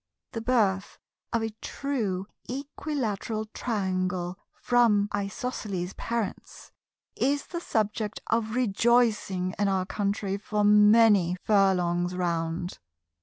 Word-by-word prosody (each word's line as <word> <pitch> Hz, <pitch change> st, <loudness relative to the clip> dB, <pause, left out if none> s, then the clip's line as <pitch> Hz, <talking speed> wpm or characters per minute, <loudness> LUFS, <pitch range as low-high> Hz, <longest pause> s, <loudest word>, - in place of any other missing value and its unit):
The 225 Hz, -, -4 dB
birth 210 Hz, -5 st, +1 dB, 0.3 s
of 230 Hz, -1 st, 0 dB
a 225 Hz, -, -2 dB
True 215 Hz, -10 st, -2 dB, 0.2 s
Equilateral 250 Hz, -6 st, -3 dB
Triangle 185 Hz, -5 st, -2 dB, 0.2 s
from 230 Hz, -4 st, +3 dB
Isosceles 200 Hz, -3 st, -3 dB
parents 230 Hz, -3 st, -5 dB, 0.4 s
is 285 Hz, +2 st, +1 dB
the 345 Hz, -1 st, -5 dB
subject 215 Hz, -4 st, -1 dB
of 225 Hz, 0 st, 0 dB
rejoicing 220 Hz, -5 st, +2 dB
in 205 Hz, -, +2 dB
our 190 Hz, -1 st, +1 dB
country 200 Hz, 0 st, -2 dB
for 210 Hz, +1 st, -1 dB
many 210 Hz, -3 st, +6 dB
furlongs 180 Hz, -3 st, +2 dB
round. 170 Hz, 0 st, -2 dB
205 Hz, 100 wpm, -27 LUFS, 185-230 Hz, 0.4 s, many